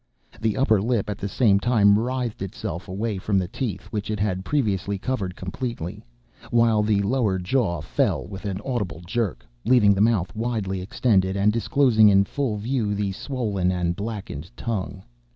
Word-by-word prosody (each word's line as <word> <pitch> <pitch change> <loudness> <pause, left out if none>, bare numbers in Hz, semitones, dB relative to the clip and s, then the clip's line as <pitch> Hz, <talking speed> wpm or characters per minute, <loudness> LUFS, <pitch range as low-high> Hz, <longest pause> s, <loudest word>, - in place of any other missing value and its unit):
The 110 -1 0
upper 110 -7 +3
lip, 110 -2 0
at 100 - -6
the 100 - -3
same 100 -3 +3
time, 105 -3 +4
writhed 120 -2 -2
itself 95 -1 -5
away 100 +2 -3
from 100 +1 0
the 95 -2 +1
teeth, 105 -1 -4
which 105 -2 -3
it 105 -1 -2
had 95 -3 -1
previously 100 -7 0
covered 95 -5 -3
completely; 100 -1 -5 0.5
while 115 -2 +3
the 105 -1 +2
lower 105 -3 +1
jaw 90 - 0
fell 80 - 0
with 100 0 -9
an 100 -1 -2
audible 105 -10 -3
jerk, 100 - -2 0.2
leaving 115 -5 +5
the 100 - 0
mouth 110 -3 +2
widely 110 -5 -2
extended, 95 -1 +1
and 105 +2 +3
disclosing 115 -2 +4
in 100 -1 +5
full 120 0 -2
view 110 -1 -1
the 100 -1 -1
swollen 100 -5 -1
and 90 -1 -1
blackened 100 -7 -6
tongue. 100 -4 -4
105 Hz, 170 wpm, -24 LUFS, 95-115 Hz, 0.5 s, leaving